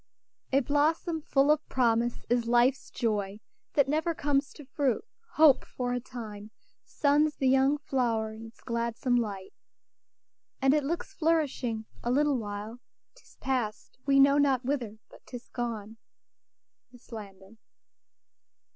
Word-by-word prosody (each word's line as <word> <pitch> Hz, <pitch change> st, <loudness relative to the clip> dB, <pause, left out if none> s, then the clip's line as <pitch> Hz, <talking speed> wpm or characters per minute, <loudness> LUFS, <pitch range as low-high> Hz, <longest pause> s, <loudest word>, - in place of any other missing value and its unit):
"A 275 Hz, +1 st, +4 dB
blossom 310 Hz, +4 st, +1 dB
full 280 Hz, 0 st, +3 dB
of 305 Hz, 0 st, +2 dB
promise 235 Hz, -1 st, +1 dB
is 240 Hz, 0 st, +1 dB
life's 245 Hz, +3 st, +2 dB
joy, 210 Hz, -3 st, -2 dB, 0.3 s
That 280 Hz, -2 st, +3 dB
never 320 Hz, +3 st, 0 dB
comes 285 Hz, -1 st, 0 dB
to 295 Hz, -, -12 dB
fruit. 270 Hz, -, -1 dB, 0.3 s
Hope, 305 Hz, -4 st, +6 dB
for 245 Hz, -1 st, -4 dB
a 245 Hz, -, -1 dB
time, 215 Hz, -4 st, -9 dB, 0.3 s
Suns 295 Hz, +1 st, +2 dB
the 265 Hz, -, 0 dB
young 270 Hz, +2 st, +4 dB
flow'ret 235 Hz, -6 st, -1 dB
in 225 Hz, +1 st, -9 dB
its 225 Hz, -, -18 dB
gladsome 235 Hz, +2 st, -1 dB
light, 200 Hz, -5 st, -3 dB, 1.1 s
And 270 Hz, 0 st, +4 dB
it 300 Hz, -1 st, +2 dB
looks 340 Hz, +6 st, -3 dB
flourishing 295 Hz, -, 0 dB, 0.2 s
a 240 Hz, -, -1 dB
little 285 Hz, +1 st, +2 dB
while 210 Hz, +2 st, -6 dB, 0.3 s
'Tis -, -, -22 dB
pass'd, 255 Hz, -4 st, -3 dB
we 275 Hz, 0 st, +5 dB
know 280 Hz, +1 st, +6 dB
not 270 Hz, -3 st, +2 dB
whither, 245 Hz, -6 st, -2 dB
but -, -, -18 dB
'tis 245 Hz, -1 st, -9 dB
gone." 225 Hz, -3 st, -5 dB, 0.9 s
MISS 245 Hz, 0 st, -19 dB
LANDON. 200 Hz, -1 st, -10 dB
255 Hz, 140 wpm, -29 LUFS, 225-285 Hz, 1.1 s, Hope